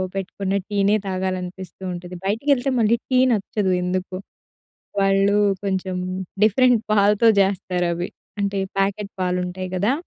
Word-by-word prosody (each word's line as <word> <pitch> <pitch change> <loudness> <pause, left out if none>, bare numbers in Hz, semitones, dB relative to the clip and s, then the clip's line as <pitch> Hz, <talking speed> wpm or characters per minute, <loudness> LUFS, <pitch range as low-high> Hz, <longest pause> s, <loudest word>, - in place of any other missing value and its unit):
పెట్టుకున్న 195 0 -3
టీనే 205 0 +2
తాగాలనిపిస్తూ 185 -1 -4
ఉంటది. 180 +1 -8
బయటికెళ్తే 250 +6 +1
మళ్ళీ 230 +1 +3
టీ 255 -1 +3
నచ్చదు 205 -2 0
ఎందుకో. 185 +1 -2 0.8
వాళ్ళు 195 +1 +3 0.3
కొంచెం 190 -1 -2 0.5
డిఫరెంట్ 240 +2 +4
పాలతో 210 +2 +4
జేస్తారు 185 -2 +1
అవి. 175 +2 -3 0.3
అంటే 200 0 -1 0.2
ప్యాకెట్ 200 +1 0
పాలు 180 0 0
ఉంటాయి 185 +1 -5
గదా! 205 +7 +2
195 Hz, 120 wpm, -22 LUFS, 185-210 Hz, 0.8 s, డిఫరెంట్